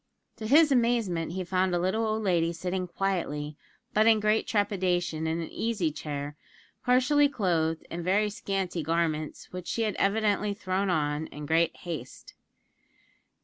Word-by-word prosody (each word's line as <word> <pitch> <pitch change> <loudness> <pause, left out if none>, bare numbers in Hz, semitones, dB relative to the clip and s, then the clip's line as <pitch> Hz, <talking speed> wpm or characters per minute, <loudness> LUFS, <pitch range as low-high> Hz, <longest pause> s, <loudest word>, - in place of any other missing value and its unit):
To 220 - -5
his 300 +4 +6
amazement, 230 -10 +1
he 185 0 -2
found 185 0 +1
a - - +1
little 190 +6 0
old 215 0 -1
lady 170 -4 +2
sitting 180 +2 -3
quietly, 165 -6 -2 0.4
but 215 +1 +4
in 220 -1 +6
great 215 +1 +1
trepidation, 180 -6 0
in 160 +1 -1
an 165 - -5
easy 210 -9 -1
chair, 145 -1 -5 0.5
partially 260 +4 +4
clothed 165 - 0
in 170 - -4
very 205 +4 +2
scanty 195 -4 -2
garments, 155 -1 -2
which 180 -1 -6
she 230 - -1
had 215 -2 0
evidently 205 0 +1
thrown 190 0 -1
on 150 -2 0
in 150 +1 -8
great 165 +2 +2
haste. 155 -8 -7
185 Hz, 150 wpm, -28 LUFS, 165-215 Hz, 0.5 s, his